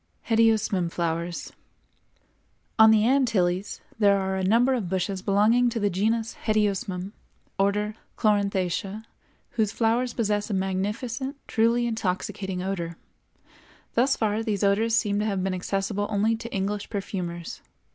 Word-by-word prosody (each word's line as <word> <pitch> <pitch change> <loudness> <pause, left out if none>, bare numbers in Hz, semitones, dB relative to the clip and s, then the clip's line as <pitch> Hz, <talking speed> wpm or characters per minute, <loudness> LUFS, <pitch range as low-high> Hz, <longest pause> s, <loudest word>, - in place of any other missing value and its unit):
=Hedyosmum 220 -5 +3
Flowers.= 170 0 -3 1.3
On 220 0 +9
the 220 -1 +5
Antilles 205 -8 +1 0.2
there 200 -2 +5
are 190 0 -1
a 190 - -1
number 235 +7 +4
of 220 -9 -2
bushes 190 +1 -1
belonging 215 +6 +3
to 230 - -3
the 205 -1 +1
Genus 220 +4 0
Hedyosmum, 200 -3 0 0.5
Order 205 +2 +1 0.2
Chloranthaceæ, 200 -1 0 0.5
whose 215 -3 0
flowers 235 +2 0
possess 210 -2 0
a 205 - -1
magnificent, 210 +8 -2
truly 230 +1 +2
intoxicating 190 -3 -2
odor. 170 -3 -3 1.0
Thus 260 +3 +3
far 215 0 0
these 215 -3 -1
odors 220 +3 +3
seem 205 -2 +1
to 210 - 0
have 195 -3 -1
been 190 0 -1
accessible 195 +2 -2
only 215 +2 +2
to 230 +1 -8
English 200 +1 -2
perfumers. 180 -5 -5
205 Hz, 130 wpm, -26 LUFS, 190-225 Hz, 1.3 s, On